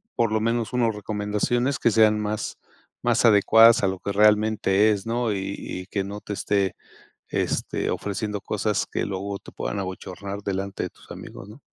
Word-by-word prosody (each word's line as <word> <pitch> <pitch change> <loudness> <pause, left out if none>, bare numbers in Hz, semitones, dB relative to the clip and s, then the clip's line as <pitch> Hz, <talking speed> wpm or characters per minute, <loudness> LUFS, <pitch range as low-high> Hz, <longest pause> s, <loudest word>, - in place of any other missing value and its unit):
por 115 -2 +1
lo 110 - +2
menos 115 +1 -1
unos 120 -2 +2
recomendaciones 105 +5 -1
que - - +3
sean 110 0 +4
más 105 0 -3 0.5
más 120 -1 +2
adecuadas 115 +1 +6
a 95 - +4
lo 95 -1 -2
que 100 - -3
realmente 105 0 +3
es, 100 -2 -2
¿no? 120 0 0
Y 100 0 -3
y 90 - -6
que 100 -1 -2
no 100 +1 -6
te 105 - -5
esté, 100 -2 0 0.6
este, - - -1
ofreciendo 105 +1 -3
cosas 105 0 -1
que - - -1
luego 100 +1 -4
te - - -13
puedan - - -4
abochornar 95 +1 -6
delante 95 0 -3
de - - -5
tus - - -21
amigos, 95 - -9
¿no? 110 +7 -13
105 Hz, 180 wpm, -24 LUFS, 100-110 Hz, 0.6 s, adecuadas